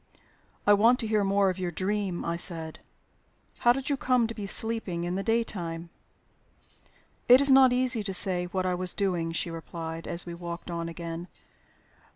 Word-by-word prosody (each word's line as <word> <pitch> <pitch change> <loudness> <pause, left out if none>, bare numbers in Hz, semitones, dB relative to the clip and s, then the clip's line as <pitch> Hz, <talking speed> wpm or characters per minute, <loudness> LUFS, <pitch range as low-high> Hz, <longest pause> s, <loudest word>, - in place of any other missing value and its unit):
"I 205 - +6
want 230 +5 +4
to 225 - -3
hear 215 -1 +1
more 195 0 +2
of 185 - -8
your 180 -1 -2
dream," 190 +1 -3
I 170 - -2
said. 165 -2 -2 0.8
"How 240 - +5
did 270 +3 -3
you 285 - +1
come 255 -3 +1
to 225 - -5
be 210 -3 -6
sleeping 215 -5 +3
in 175 +1 -3
the 190 - -2
daytime?" 175 -7 -3 1.4
"It 250 +1 +9
is 280 0 +4
not 265 -1 +7
easy 250 -3 +1
to 195 - -3
say 180 -1 +2
what 185 +1 -3
I 180 - 0
was 180 0 -4
doing," 175 -5 -1
she 165 +1 -2
replied, 165 0 -7
as 170 - -3
we 170 - -7
walked 170 0 -7
on 170 0 -4
again. 170 +1 -7
185 Hz, 185 wpm, -27 LUFS, 170-225 Hz, 1.4 s, It